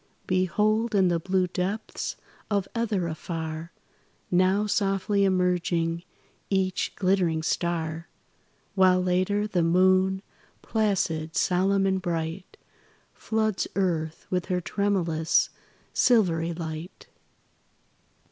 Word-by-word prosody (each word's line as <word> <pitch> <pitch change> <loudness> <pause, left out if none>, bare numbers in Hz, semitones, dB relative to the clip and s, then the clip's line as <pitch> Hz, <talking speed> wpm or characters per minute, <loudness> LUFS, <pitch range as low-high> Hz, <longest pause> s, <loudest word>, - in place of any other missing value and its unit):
Behold, 210 +5 +1
in 190 -2 +4
the 170 -1 +1
blue 185 +2 +1
depths 185 +4 -3 0.3
of 200 -3 0
ether 215 -6 0
afar, 160 0 -5 0.6
Now 185 +3 +3
softly 200 -1 +1
emerging 180 -2 +1 0.5
each 190 -2 0
glittering 185 -4 +1
star; 165 -1 -2 0.7
While, 185 -1 +4
later, 185 +3 +1
the 190 -5 0
moon, 185 +3 +3 0.4
placid, 185 -7 0
solemn 195 +2 +2
and 190 -1 +1
bright, 170 +1 -4 0.6
Floods 220 -2 -1
earth 165 -5 -1
with 180 -1 -1
her 180 -1 0
tremulous, 175 -4 +1 0.4
silvery 170 -9 +3
light. 165 +1 -7
185 Hz, 95 wpm, -26 LUFS, 170-195 Hz, 0.7 s, in